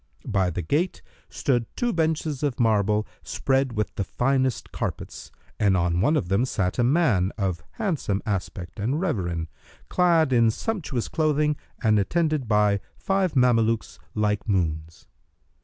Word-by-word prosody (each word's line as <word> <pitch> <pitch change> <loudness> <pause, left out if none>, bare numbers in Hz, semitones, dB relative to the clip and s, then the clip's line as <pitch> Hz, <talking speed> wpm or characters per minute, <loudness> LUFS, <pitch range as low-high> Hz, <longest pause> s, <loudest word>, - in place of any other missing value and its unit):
By 95 -3 +1
the 90 0 -3
gate 160 - -1 0.3
stood 120 -5 0
two 240 -1 0
benches 160 -3 0
of 140 -4 -1
marble, 105 -2 +2 0.2
spread 135 -2 0
with 105 -1 -2
the 100 - 0
finest 130 +4 0
carpets, - - -5 0.3
and 100 -3 +3
on 85 0 +1
one 150 +9 +3
of 90 - -1
them 95 +5 +2
sat 95 -5 -1
a - - +4
man 120 - +3
of 95 -6 -1
handsome 155 - -1
aspect 95 -3 -4
and 125 +9 0
reverend, 85 - -1 0.4
clad 170 -6 +3
in 115 -2 +5
sumptuous 150 - -2
clothing 150 -1 +1 0.3
and 110 -2 +4
attended 155 - 0
by 105 -2 +3 0.2
five 195 -5 0
Mamelukes 115 -3 +2 0.2
like 105 0 0
moons. 80 -4 -1
115 Hz, 140 wpm, -25 LUFS, 100-150 Hz, 0.4 s, in